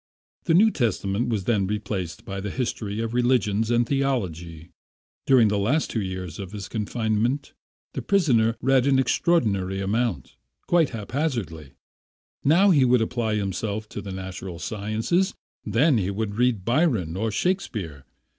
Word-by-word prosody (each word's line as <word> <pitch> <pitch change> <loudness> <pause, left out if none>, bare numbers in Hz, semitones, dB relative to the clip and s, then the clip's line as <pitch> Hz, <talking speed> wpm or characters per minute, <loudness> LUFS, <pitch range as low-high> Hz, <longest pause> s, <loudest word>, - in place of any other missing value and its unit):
The 165 - +3
New 215 +5 +6
Testament 110 - -1
was 110 -5 -1
then 100 -3 +1
replaced 95 -5 -4
by 95 0 -5
the 100 - -4
history 110 -2 -3
of 115 0 -3
religions 115 -3 +1
and 120 0 +3
theology. 90 - -2 0.6
During 125 -4 +6
the 100 0 0
last 135 +11 +1
two 110 - -1
years 95 -3 -5
of 100 0 -7
his 100 -3 -6
confinement 110 +4 -1 0.4
the - - -3
prisoner 120 - +2
read 135 0 +3
an 135 -1 +4
extraordinary 105 - +1
amount, 100 - -2 0.3
quite 170 -4 +3
haphazard. 110 - -3 0.7
Now 180 +8 +5
he 145 -6 +5
would 125 -2 +4
apply 110 -2 -1
himself 105 +2 -3
to 105 - -6
the 100 - -7
natural 95 -1 -6
sciences, 110 - -1 0.3
then 120 +5 +3
he 95 -1 -1
would 100 +1 -3
read 115 -4 +1
Byron 120 - +1
or 110 +3 -1
Shakespeare. 105 - -2
110 Hz, 145 wpm, -24 LUFS, 95-130 Hz, 0.7 s, New